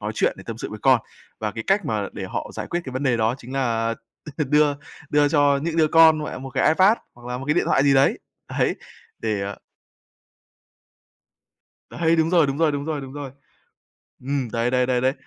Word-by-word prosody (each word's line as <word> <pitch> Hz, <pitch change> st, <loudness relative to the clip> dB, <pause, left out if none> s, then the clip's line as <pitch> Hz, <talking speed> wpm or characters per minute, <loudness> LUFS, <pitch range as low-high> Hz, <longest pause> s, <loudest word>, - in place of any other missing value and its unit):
nói 105 Hz, +1 st, -4 dB
chuyện, -, -, +1 dB
để -, -, -11 dB
tâm 115 Hz, -1 st, -6 dB
sự -, -, -6 dB
với 105 Hz, -, -7 dB
con. 130 Hz, -3 st, +5 dB, 0.4 s
Và 105 Hz, -, -1 dB
cái 115 Hz, +1 st, -6 dB
cách 195 Hz, -1 st, +2 dB
mà 105 Hz, -4 st, -2 dB
để -, -, -6 dB
họ -, -, -5 dB
giải -, -, -5 dB
quyết 175 Hz, -, -2 dB
cái 130 Hz, -, -7 dB
vấn 130 Hz, -, -3 dB
đề 130 Hz, -4 st, +2 dB
đó 115 Hz, +2 st, +1 dB
chính 125 Hz, 0 st, -11 dB
là 115 Hz, -4 st, 0 dB, 0.4 s
đưa 150 Hz, 0 st, +3 dB, 0.4 s
đưa 145 Hz, 0 st, +4 dB
cho 145 Hz, -2 st, +3 dB
những 165 Hz, 0 st, -2 dB
đứa 160 Hz, -, +4 dB
con, 160 Hz, -1 st, +6 dB
mẹ, 130 Hz, -, -6 dB
một 135 Hz, +1 st, -8 dB
cái 130 Hz, 0 st, +2 dB
Ipad 190 Hz, +8 st, +5 dB, 0.2 s
hoặc 120 Hz, 0 st, -14 dB
là 125 Hz, 0 st, -3 dB
một 135 Hz, -, -7 dB
cái 150 Hz, -, +2 dB
điện -, -, +2 dB
thoại 135 Hz, -, +3 dB
gì 140 Hz, -1 st, +4 dB
đấy, 135 Hz, +1 st, +3 dB, 0.3 s
đấy, -, -, 0 dB, 0.4 s
để 100 Hz, -2 st, -2 dB, 2.4 s
Đấy, 165 Hz, 0 st, +1 dB
đúng 160 Hz, 0 st, +2 dB
rồi, 170 Hz, -5 st, +4 dB
đúng 135 Hz, +1 st, -3 dB
rồi, 160 Hz, -2 st, +3 dB
đúng 145 Hz, 0 st, -3 dB
rồi, 155 Hz, -2 st, -3 dB
đúng 135 Hz, -1 st, -9 dB
rồi. 140 Hz, -3 st, -7 dB, 0.9 s
Ừm, 135 Hz, -2 st, -2 dB
đấy, 115 Hz, +1 st, 0 dB
đấy, 125 Hz, 0 st, +2 dB
đấy, 125 Hz, -1 st, 0 dB
đấy. 130 Hz, +1 st, +2 dB
135 Hz, 215 wpm, -23 LUFS, 120-150 Hz, 2.4 s, con